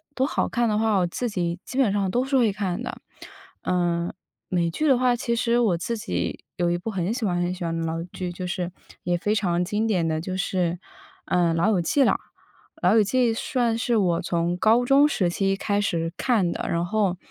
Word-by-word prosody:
都 260 - +2
好 - - 0
看 240 -1 0
的 210 - +1
话， 220 -2 +2
我 180 - +2
自 235 +7 -3
己 175 -3 -2
基 260 - -7
本 260 -7 +3
上 200 -2 0
都 245 +6 +1
是 270 0 +1
会 225 -5 +3
看 190 -3 -2
的。 - - -5 0.7
呃， 175 -1 0 0.4
美 170 -2 0
剧 310 - -1
的 265 - +5
话， 250 0 +3
其 235 -1 -1
实 235 0 +2
我 205 -8 +2
自 230 +7 -3
己 90 - -3
有 175 -1 +1
一 175 - +1
部 180 +6 -5
很 190 0 -1
喜 240 -2 -2
欢 175 -3 0
很 175 +1 0
喜 180 -2 -5
欢 165 0 -2
的 165 - -2
老 165 +1 -2
剧， 180 -2 -4
就 180 +1 -5
是 180 0 -3 0.3
也 175 0 0
非 210 +5 0
常 180 -4 +1
经 210 +3 -1
典 180 -7 +1
的 160 0 -1
就 185 +1 -4
是， 180 -3 -1 0.5
呃， 175 -2 +2
《老 165 +5 +2
友 190 -5 +2
记》 275 - +1
了。 - - +3 0.7
《老 - - +5
友 220 - +6
记》 235 +3 +2
算 240 -5 0
是 235 0 +1
我 180 -4 +2
从 170 0 0
高 225 +6 +3
中 275 +3 +5
时 195 -12 +1
期 195 +2 0
开 205 0 0
始 165 -3 -1
看 220 -9 +1
的， - - -4
然 170 +1 0
后 195 -1 0
190 Hz, 245 characters per minute, -24 LUFS, 175-230 Hz, 0.7 s, 友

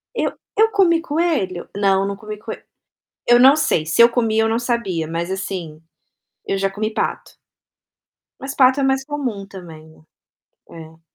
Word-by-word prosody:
Eu - - 0 0.3
eu 445 +1 +4
comi 345 -5 +3
coelho? 300 - -1
Não, 195 -1 +2
não 200 - -3
comi 215 +1 -8
coe 210 - -8 0.7
eu 240 0 +7
não 270 +4 +7
sei, 155 - +1
se 165 +9 +2
eu 235 - +9
comi, 225 -2 0
eu 220 - +3
não 225 +1 0
sabia, 235 -9 -2
mas 165 +2 -4
assim, 180 -5 -5 0.6
eu 195 - -1
já 195 0 0
comi 215 +2 -4
pato. - - -3 1.1
Mas 275 +1 -6
pato 260 +1 +4
é - - +1
mais 270 0 +1
comum 255 -9 -4
também. 160 -5 -13 0.7
É. 160 0 -12
215 Hz, 160 wpm, -20 LUFS, 185-265 Hz, 1.1 s, eu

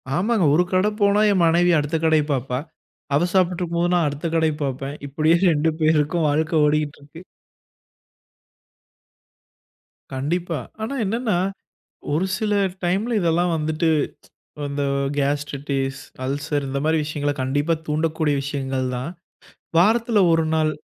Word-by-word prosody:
ஆமாங்க. 200 0 +2
ஒரு 170 +4 +4
கடை 185 +3 +3
போனா 200 +1 +4
என் 185 - +2
மனைவி 175 +2 +4
அடுத்த 150 +2 -2
கடையப் 155 -2 +3
பாப்பா. 125 0 -2 0.6
அவ 155 +5 +3
சாப்பிட்டு 180 -1 +2
இருக்கும்போது 170 +1 0
நான் 165 -4 +2
அடுத்த 145 +3 -3
கடைய 160 -1 +2
பார்ப்பேன். 135 +1 -3
இப்படியே 155 +4 +2
2 160 -2 +3
பேருக்கும் 155 +1 +2
வாழ்க்கை 155 +3 0
ஓடிக்கிட்டிருக்கு. 150 +1 -2 2.9
கண்டிப்பா. 165 +5 -2 0.2
ஆனா, 235 +6 -3
என்னென்னா 220 -2 0 0.8
ஒரு 170 +5 +1
சில 215 -1 -1 0.3
டைம்ல 200 +7 0
இதெல்லாம் 175 +1 +1
வந்துட்டு 155 +1 0 0.8
இந்த 140 0 -3 0.4
கேஸ்ட்ரிட்டிஸ், 140 -1 -2 0.2
அல்சர் 145 +1 -2
இந்த 140 - -2
மாதிரி 160 +1 +2
விஷயங்கள 145 -1 -2
கண்டிப்பா 145 +5 +1
தூண்டக்கூடிய 155 0 0
விஷயங்கள் 135 -2 -2
தான். 130 +7 -4 0.7
வாரத்துல 225 +4 +3
ஒரு 165 0 +3
நாள், 155 -1 +2
155 Hz, 120 wpm, -22 LUFS, 145-175 Hz, 2.9 s, ஒரு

